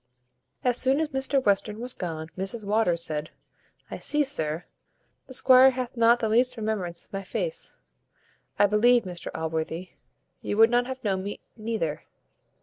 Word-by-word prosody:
As 250 -1 +3
soon 265 +2 +2
as 315 -1 -1
Mr 270 0 0
Western 210 +1 +1
was 245 +1 -2
gone 160 -3 -5
Mrs 195 +4 -4
Waters 200 -5 +1
said, 155 -2 -2 0.6
"I - - -5
see, 295 0 +3
sir, 160 - -2 0.6
the 260 - -10
squire 260 0 +7
hath 255 -1 -4
not 235 +1 +4
the 225 - 0
least 250 +3 +3
remembrance 210 -6 -3
of - - -27
my 195 - -3
face. 485 - -4 0.8
I - - +5
believe, 235 +4 +4
Mr 180 -2 -7
Allworthy, 160 +2 -3 0.5
you 205 - -3
would 225 +1 +6
not 245 0 +2
have 260 0 -6
known 195 -3 0
me 200 +2 -6 0.2
neither. 215 -9 -3
220 Hz, 160 wpm, -26 LUFS, 180-250 Hz, 0.8 s, squire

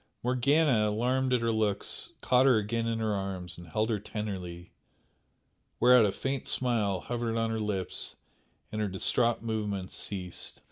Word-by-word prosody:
Morgana, 125 -2 +3
alarmed 125 +4 +1
at 125 -2 +3
her 115 0 +1
looks, 105 -2 0
caught 130 +1 +4
her 125 -4 +6
again 115 +2 -1
in 115 0 0
her 110 -1 0
arms 95 -4 -4
and 85 - -11
held 110 +7 0
her 105 - 0
tenderly, 95 -5 -6 1.1
whereat 125 -3 +7
a - - 0
faint 135 +5 -3
smile 105 -7 +1
hovered 120 -1 -2
on 115 0 0
her 110 - -1
lips 105 -3 -1 0.6
and 110 - -2
her 105 - +1
distraught 115 +5 +1
movements 105 -4 -3
ceased. 90 -3 -6
110 Hz, 155 wpm, -29 LUFS, 100-120 Hz, 1.1 s, whereat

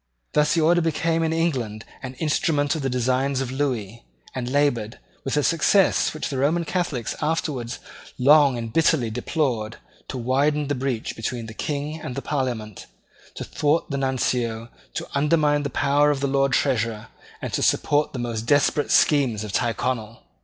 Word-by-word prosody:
Thus 150 +2 +3
the 165 - +2
Order 170 +2 +4
became 165 0 0
in 160 -1 +1
England 130 -10 -1 0.2
an 130 0 -7
instrument 145 0 +1
of 160 - -3
the 135 - -1
designs 130 +2 0
of 130 -2 -3
Lewis, 120 -6 -2 0.3
and 125 -1 -3
laboured, 125 -6 +1 0.3
with 135 +2 -1
a 150 - +2
success 175 +5 +3
which 155 - -3
the 135 - -3
Roman 165 +5 +1
Catholics 160 - -2
afterwards 150 -6 -2 0.4
long 140 0 +5
and 115 -1 -5
bitterly 155 -8 +2
deplored, 120 -2 -2 0.3
to 130 - -5
widen 140 +4 +1
the - - +1
breach 130 -4 -3
between 115 +1 -4
the 110 - -9
King 150 +5 -4
and 125 - -6
the 140 - -4
Parliament, 120 -8 -3 0.5
to - - -5
thwart 150 +2 0
the 140 - -1
Nuncio, 120 -4 -1 0.3
to - - -4
undermine 150 0 +2
the 140 - -3
power 145 +2 +2
of 145 -2 0
the 140 - -1
Lord 135 0 +1
Treasurer, 115 -6 0 0.3
and - - -6
to - - 0
support 145 +1 +2
the - - -6
most 115 -2 -3
desperate 145 +1 +2
schemes 130 -8 +3
of 105 - -6
Tyrconnel. 115 0 -2
135 Hz, 170 wpm, -23 LUFS, 120-150 Hz, 0.5 s, long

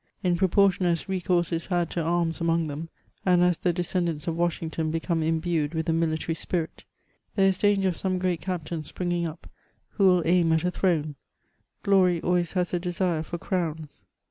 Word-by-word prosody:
In 180 -2 +2
proportion 190 0 +3
as 170 +2 0
re 190 -1 -2
course 175 -2 +1
is 165 0 -2
had 175 -3 0
to 170 - -1
arms 165 0 0
among 165 0 +1
them, 155 +2 -6 0.3
and 180 -2 +4
as 180 -2 +3
the 180 - +1
descendants 170 -3 -2
of 165 - -2
Washington 165 -2 -1
become 165 +1 -1
imbued 160 -1 0
with 160 0 -1
the 165 - +1
military 165 0 0
spirit, 165 0 -3 0.5
there 195 -1 +4
is 190 -1 -1
danger 200 -2 +3
of 175 - -4
some 185 -1 -1
great 180 -2 -1
captain 170 -3 -4
springing 175 +1 -2
up, 160 +1 -10 0.4
who 200 -3 +2
will 180 -2 +4
aim 170 -1 +3
at 160 0 +1
a 180 - +1
throne; 155 -6 0 0.7
glory 185 -3 +4
always 175 -1 +1
has 180 -2 -1
a 175 - +1
desire 175 -2 -1
for 170 +2 -5
crowns. 160 -5 -4
175 Hz, 190 wpm, -26 LUFS, 165-180 Hz, 0.7 s, and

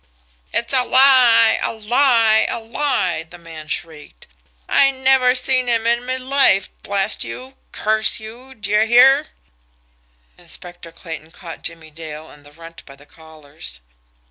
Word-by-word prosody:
"It's 235 +3 -2
a 255 -1 +3
lie! 250 -4 +4
A - - -2
lie! 225 0 +2
A - - -3
lie!" 225 - -2
the 175 - -13
man 165 -2 -12
shrieked. 150 - -7 0.4
"I 275 - +3
never 260 -1 +2
seen 255 0 +2
him 230 -2 +1
in 235 +1 0
me 255 0 -2
life 260 -7 +2
blast 200 -1 -2
you! 260 +1 -8 0.2
curse 215 +1 +1
you! 240 +5 -12
d'ye 210 +1 0
hear!" 265 +5 +5 1.1
Inspector 175 -1 -7
Clayton 160 -2 -9
caught 165 -1 -11
Jimmie 165 -1 -7
Dale 155 0 -9
and 145 - -17
the 145 - -17
Runt 165 +2 -14
by 140 - -12
the 145 +1 -19
collars. 155 - -9
220 Hz, 145 wpm, -18 LUFS, 165-255 Hz, 1.1 s, hear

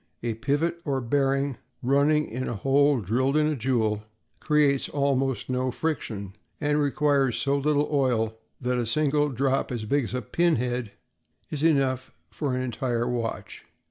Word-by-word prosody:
A 120 -1 -1
pivot 145 +8 -1
or 140 -3 -1
bearing, 135 +1 0 0.3
running 145 +4 +3
in 130 +3 -4
a - - -3
hole 135 +3 +3
drilled 130 - +1
in 155 - +3
a 155 0 +1
jewel, 110 -4 0 0.4
creates 145 -3 +2
almost 135 -2 0
no 130 0 0
friction 115 -9 -3 0.3
and 150 0 +1
requires 140 -4 +2
so 140 +4 +1
little 145 +1 +1
oil 120 -6 +1 0.2
that 125 -1 0
a 120 - -1
single 150 +3 +2
drop 135 +1 0
as 115 -3 -3
big 140 +3 +1
as 125 - -5
a 125 - -2
pinhead 125 -7 0 0.6
is 145 - -3
enough 135 -5 +2 0.2
for 140 -4 -2
an 130 - -1
entire 120 -1 -1
watch. 120 -2 -4
135 Hz, 155 wpm, -26 LUFS, 120-145 Hz, 0.6 s, running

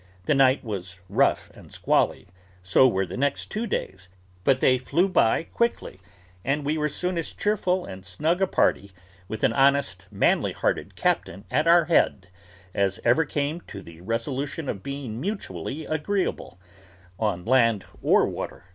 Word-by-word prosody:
The - - +3
night 135 -1 +4
was 95 -5 -6
rough 130 +8 +1
and - - -15
squally, - - +1 0.4
so 90 +8 +5
were 95 -5 0
the 90 - -7
next 140 +1 -1
two 220 +2 -2
days, 95 - -4 0.3
but 130 +3 +3
they 130 -1 +4
flew 170 +9 +1
by 165 -8 +2
quickly, 235 - -2 0.4
and 140 +1 -1
we 150 +2 0
were 150 -1 0
soon 180 +4 -2
as 165 - -4
cheerful 185 -3 0
and 95 0 -9
snug 155 - -1
a 190 - +3
party, 100 - +1 0.3
with 110 +2 -6
an - - +3
honest, 135 -9 +2
manly - - +1
hearted - - -2
captain 95 +5 -1
at 155 +2 +1
our 170 -1 +6
head, 100 - +2 0.4
as 100 -1 0
ever 125 +7 +3
came 150 +3 -2
to 100 -1 -8
the 85 0 -13
resolution 135 - -3
of 100 - -3
being 130 -2 -5
mutually 155 - -4
agreeable, 155 - -2 0.6
on 100 -5 -1
land 115 -4 +3 0.2
or - - +4
water. - - -6
135 Hz, 160 wpm, -25 LUFS, 100-160 Hz, 0.6 s, our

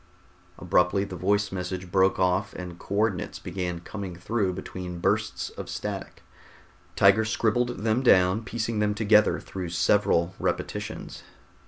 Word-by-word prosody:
Abruptly 90 +2 +2
the 100 -2 -6
voice 100 +3 +1
message 90 -1 -5
broke 95 0 +3
off 95 +2 +1
and 90 -1 -7
co 100 - -5
ordinates 105 -3 0
began 90 -2 -4
coming 95 -1 -6
through 100 +2 -1
between 90 -1 -6
bursts 105 +4 -1
of - - -8
static. - - -5 0.7
Tiger 100 +3 +5
scribbled 115 0 0
them 115 +2 +2
down, 95 -3 +4
piecing 115 0 -2
them 105 -1 +1
together 105 0 +4
through 90 -3 -6
several 85 0 +2
repetitions. - - -4
95 Hz, 135 wpm, -26 LUFS, 90-105 Hz, 0.7 s, Tiger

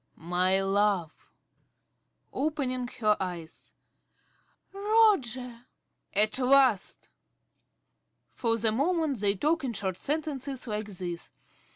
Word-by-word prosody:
~ - - -45
My 180 +3 0
love! 195 -4 +1
~Dorothy~ - - -40
(opening 265 -4 -2
her 210 -1 +4
eyes). 175 -4 -7 1.0
Roger! 395 +1 -8 0.6
~Roger.~ 245 -1 -11 0.5
At 215 +4 +4
last! 255 -6 +3 1.3
(_For 230 -2 0
the 220 0 +2
moment 295 - 0
they 200 0 +1
talk 310 - 0
in 250 -3 -2
short 190 -3 -3
sentences 285 -3 -3
like 210 -2 -4
this. 180 -4 -6
225 Hz, 105 wpm, -28 LUFS, 195-270 Hz, 1.3 s, her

